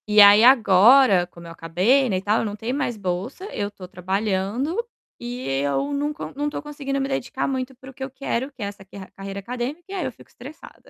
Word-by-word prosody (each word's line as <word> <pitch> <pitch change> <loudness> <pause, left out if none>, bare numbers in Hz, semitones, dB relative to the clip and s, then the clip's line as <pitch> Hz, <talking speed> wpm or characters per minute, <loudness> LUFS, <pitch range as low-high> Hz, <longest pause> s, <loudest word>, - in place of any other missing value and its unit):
E 210 0 +4
aí, 205 +1 +9
agora, 225 -4 +6
como 170 0 -14
eu 165 - -9
acabei, 190 +12 +2
né, 190 - 0
e - - -3
tal, 210 +2 +1
não 205 -2 -3
tem 225 +4 -4
mais 260 -5 -2
bolsa, 195 - -4
eu 205 - -2
estou 200 -3 -11
trabalhando 200 - -2 0.4
e 245 +1 -6
eu 275 - -1
não 290 +1 -1
co 300 - -7
não 290 +1 -2
estou 295 - -3
conseguindo 285 -2 -4
me 270 - -1
dedicar 270 -1 -2
muito 260 -1 -3
para 265 +2 -12
o - - -21
que 265 +1 -7
eu 265 - -4
quero, 265 0 -3
que 255 -6 -8
é - - -1
essa 200 -1 -8
quer 195 0 -12
carreira 195 0 -7
acadêmica 250 - -5
e - - -7
aí 375 -4 -2
eu 260 - -3
fico - - -19
estressada. 275 +6 -13
240 Hz, 230 wpm, -23 LUFS, 195-275 Hz, 0.4 s, aí